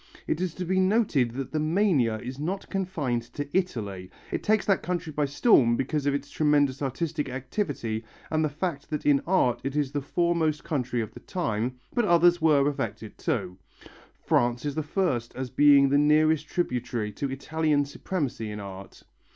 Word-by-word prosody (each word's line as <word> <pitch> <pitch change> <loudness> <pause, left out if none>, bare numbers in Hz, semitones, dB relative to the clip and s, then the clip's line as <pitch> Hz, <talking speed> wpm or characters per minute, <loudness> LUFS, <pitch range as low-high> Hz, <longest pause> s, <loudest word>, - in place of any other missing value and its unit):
It 155 - -1
is 180 -3 -2
to 180 - -4
be 185 +2 +1
noted 185 - +2
that 135 -1 -4
the 155 - -1
mania 155 - +2
is 125 +2 -7
not 185 +6 -4
confined 165 -11 -1
to 145 - -4
Italy, 105 - -2 0.2
it - - -2
takes 215 0 +2
that 195 -3 +2
country 175 -3 -3
by 150 0 +1
storm 135 - +4
because 145 +2 -1
of 140 - +2
its 140 0 -5
tremendous 145 -3 +2
artistic 150 +2 -2
activity 130 - -3 0.3
and 155 0 +2
the 155 - +1
fact 150 -1 -4
that 150 - -3
in 145 -2 +4
art 170 -10 +2
it 135 +1 -3
is 145 -3 0
the 145 0 -2
foremost 160 0 0
country 125 -5 -1
of 110 - -6
the - - -10
time; 125 - -2 0.2
but 240 - +2
others 175 -1 +4
were 145 -3 +4
affected 115 -7 -4
too. 90 +1 -2 0.7
France 120 +2 +1
is 145 - -1
the 155 - -1
first 150 -7 -1
as 130 -2 -5
being 140 0 +6
the 140 +1 +4
nearest 155 +1 +3
tributary 125 - -2
to 135 +7 -4
Italian 145 +2 0
supremacy 140 - -3
in 105 0 -6
art. 95 -1 -10
145 Hz, 180 wpm, -27 LUFS, 125-165 Hz, 0.7 s, being